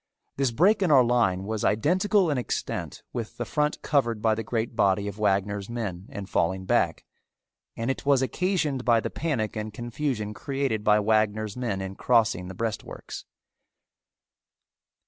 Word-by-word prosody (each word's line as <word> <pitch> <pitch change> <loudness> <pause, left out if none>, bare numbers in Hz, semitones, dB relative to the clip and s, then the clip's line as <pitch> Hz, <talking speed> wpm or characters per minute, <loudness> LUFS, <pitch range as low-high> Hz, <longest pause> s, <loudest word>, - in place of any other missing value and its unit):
This 135 -1 +1
break 185 - +3
in 185 - +2
our 135 -4 +7
line 115 -6 +2
was 110 +1 -3
identical 180 - +2
in 140 - 0
extent 125 - -4
with 115 -3 -5
the 120 - -3
front 150 +3 0
covered 120 -7 +1
by 110 0 +2
the 110 - -2
great 115 +1 -2
body 100 0 +2
of 100 +1 -6
Wagner's 100 0 0
men 105 -6 -4
in 100 - -6
falling 95 +1 0
back, - - +1 0.7
and 115 +3 0
it - - -5
was 140 -2 +3
occasioned 155 -4 0
by 120 -2 +4
the - - -4
panic 130 -11 -2
and 110 0 -4
confusion 120 -1 -3
created 135 -4 -2
by 105 0 +5
Wagner's 110 0 +1
men 115 -6 -2
in 95 0 -5
crossing 115 -5 +2
the 95 - -8
breastworks. 115 +1 -5
115 Hz, 160 wpm, -26 LUFS, 105-135 Hz, 0.7 s, our